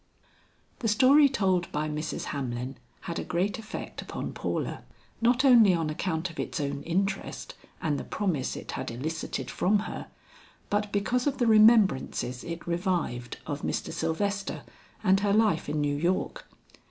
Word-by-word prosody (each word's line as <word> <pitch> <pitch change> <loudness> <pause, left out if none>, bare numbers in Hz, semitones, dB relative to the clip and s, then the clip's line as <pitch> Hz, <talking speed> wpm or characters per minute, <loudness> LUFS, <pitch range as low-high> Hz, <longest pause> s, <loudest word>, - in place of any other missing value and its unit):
The 240 - -1
story 270 +7 +6
told 190 -8 +1
by 150 +1 -1
Mrs. 150 +1 -3
Hamlin 130 -1 -4 0.2
had 170 - -4
a - - -3
great 200 +7 -1
effect 220 -1 -6
upon - - -5
Paula, - - -3 0.4
not 245 +3 +3
only 230 -8 +7
on 160 -2 -1
account 165 +2 -2
of 165 - -12
its - - -3
own 140 -1 -2
interest 195 +3 -2 0.3
and 150 -3 0
the - - -5
promise 175 -11 -1
it - - -7
had - - -4
elicited 130 0 -4
from 205 +2 +2
her, - - -6 0.6
but 205 0 0
because 240 +6 0
of 275 - 0
the 245 - +2
remembrances 215 - +4
it 170 0 -6
revived 170 - -2
of 145 -1 -4
Mr. - - -2
Sylvester 195 +5 -2 0.4
and 190 -1 +4
her 200 0 +1
life 215 -7 +2
in 150 +1 -1
New 145 -1 +1
York. 175 +5 -1
180 Hz, 155 wpm, -28 LUFS, 150-210 Hz, 0.6 s, only